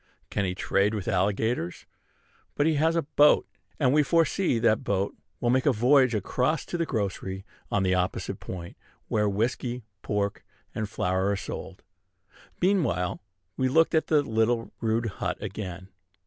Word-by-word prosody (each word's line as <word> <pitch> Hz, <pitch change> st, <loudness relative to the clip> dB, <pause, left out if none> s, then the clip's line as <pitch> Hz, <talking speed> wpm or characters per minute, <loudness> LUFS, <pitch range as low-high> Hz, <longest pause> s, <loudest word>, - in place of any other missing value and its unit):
Can 100 Hz, -, 0 dB
he 90 Hz, -1 st, -2 dB
trade 100 Hz, +3 st, +1 dB
with 105 Hz, -1 st, -4 dB
alligators? 100 Hz, -1 st, 0 dB, 0.7 s
But 145 Hz, -, +2 dB
he 160 Hz, -, +3 dB
has 160 Hz, +3 st, +2 dB
a 165 Hz, -, +1 dB
boat; 150 Hz, +1 st, +4 dB, 0.3 s
and 130 Hz, -3 st, +3 dB
we 150 Hz, -, +5 dB
foresee 165 Hz, -1 st, +2 dB
that 115 Hz, +1 st, +2 dB
that 110 Hz, -1 st, +2 dB
boat 100 Hz, 0 st, -1 dB, 0.2 s
will 120 Hz, -, +1 dB
make 130 Hz, +3 st, +2 dB
a -, -, +6 dB
voyage 125 Hz, +1 st, +4 dB
across 130 Hz, -, 0 dB
to 175 Hz, -, -4 dB
the 165 Hz, -, 0 dB
grocery 95 Hz, -4 st, -3 dB, 0.2 s
on 100 Hz, -, +1 dB
the 95 Hz, -1 st, +2 dB
opposite 90 Hz, 0 st, -1 dB
point, 85 Hz, -2 st, -8 dB, 0.3 s
where 105 Hz, -1 st, +2 dB
whiskey, 120 Hz, +4 st, -1 dB, 0.2 s
pork, 100 Hz, -1 st, -2 dB, 0.3 s
and 110 Hz, -2 st, -3 dB
flour 95 Hz, 0 st, 0 dB
are 100 Hz, -, +1 dB
sold. -, -, -7 dB, 0.8 s
Meanwhile 165 Hz, -, +1 dB, 0.4 s
we 130 Hz, -, +2 dB
looked 160 Hz, +4 st, +4 dB
at 160 Hz, -, +2 dB
the 150 Hz, -2 st, +3 dB
little 115 Hz, -1 st, 0 dB
rude 115 Hz, 0 st, +1 dB
hut 95 Hz, -4 st, -3 dB
again. 95 Hz, -2 st, -6 dB
110 Hz, 160 wpm, -27 LUFS, 100-140 Hz, 0.8 s, a